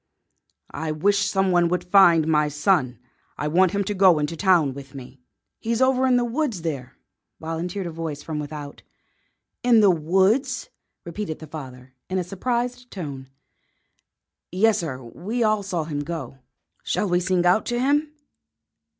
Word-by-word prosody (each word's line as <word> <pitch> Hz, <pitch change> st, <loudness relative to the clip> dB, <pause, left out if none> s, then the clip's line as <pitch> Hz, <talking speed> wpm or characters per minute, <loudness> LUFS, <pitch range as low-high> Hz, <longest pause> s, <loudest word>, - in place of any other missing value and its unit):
"I 160 Hz, +1 st, -3 dB
wish 200 Hz, +6 st, +1 dB
some 190 Hz, -1 st, +1 dB
one 175 Hz, -1 st, +3 dB
would 180 Hz, +1 st, -1 dB
find 180 Hz, -4 st, +5 dB
my 150 Hz, -1 st, +3 dB
son. 145 Hz, -, +1 dB, 0.4 s
I 150 Hz, -, -2 dB
want 180 Hz, +4 st, +3 dB
him 200 Hz, 0 st, 0 dB
to 205 Hz, -, -3 dB
go 185 Hz, -4 st, +5 dB
into 150 Hz, +2 st, -2 dB
town 170 Hz, -7 st, +3 dB
with 140 Hz, 0 st, -11 dB
me." 130 Hz, 0 st, -11 dB, 0.4 s
"He's 230 Hz, +1 st, -1 dB
over 260 Hz, 0 st, +3 dB
in 250 Hz, -1 st, +4 dB
the 245 Hz, -, +1 dB
woods 240 Hz, -, -2 dB
there," 135 Hz, -6 st, -5 dB, 0.4 s
volunteered 170 Hz, +4 st, -4 dB
a 170 Hz, -, -4 dB
voice 160 Hz, -3 st, -5 dB
from 155 Hz, -2 st, -4 dB
without. 145 Hz, -1 st, -7 dB, 0.8 s
"In 240 Hz, -2 st, +5 dB
the 205 Hz, -3 st, +6 dB
woods!" 195 Hz, -, +1 dB, 0.3 s
repeated 170 Hz, -1 st, -5 dB
the 160 Hz, -, -10 dB
father, 130 Hz, -4 st, -10 dB, 0.2 s
in 190 Hz, -, -1 dB
a 185 Hz, -, 0 dB
surprised 245 Hz, +6 st, -3 dB
tone. 140 Hz, -8 st, -7 dB, 1.2 s
"Yes, 215 Hz, +3 st, +2 dB
sir; 130 Hz, -6 st, -5 dB
we 200 Hz, -, -3 dB
all 215 Hz, -1 st, +2 dB
saw 185 Hz, -4 st, -2 dB
him 150 Hz, -2 st, -4 dB
go. 145 Hz, -4 st, -6 dB, 0.4 s
Shall 210 Hz, -, -1 dB
we 175 Hz, -1 st, +2 dB
sing 180 Hz, -1 st, 0 dB
out 180 Hz, +5 st, +3 dB
to 240 Hz, 0 st, -1 dB
him?" 290 Hz, +4 st, +1 dB
175 Hz, 160 wpm, -23 LUFS, 150-205 Hz, 1.2 s, the